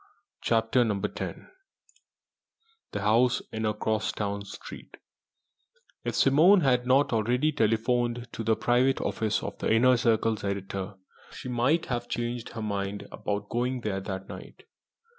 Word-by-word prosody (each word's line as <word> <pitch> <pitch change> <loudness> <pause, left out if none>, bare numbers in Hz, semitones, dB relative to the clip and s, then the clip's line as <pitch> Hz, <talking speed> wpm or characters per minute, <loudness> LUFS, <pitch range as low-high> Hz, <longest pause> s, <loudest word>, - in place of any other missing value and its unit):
CHAPTER 115 +2 +2
X 105 -4 -2 1.5
THE - - -3
HOUSE 115 +5 +3
IN 110 0 -2
A 105 - -1
CROSSTOWN 105 -2 -2
STREET 95 - -10 1.1
If - - -2
Simone 165 +8 +6
had 125 -4 +2
not 135 +1 +3
already 125 +7 +2
telephoned 120 -1 0
to 115 - -5
the 110 0 +2
private 125 +4 +2
office 110 -1 -1
of - - -6
the - - 0
Inner 125 +3 +5
Circle's 115 -1 +1
editor, 100 0 -4 0.4
she - - -8
might 125 +7 +2
have 120 -1 -3
changed 120 0 -3
her 115 -2 -5
mind 100 -1 -3
about 105 0 -4
going 125 +2 -1
there 100 -4 -2
that 95 -1 -5
night. - - -11
115 Hz, 135 wpm, -28 LUFS, 105-125 Hz, 1.5 s, Simone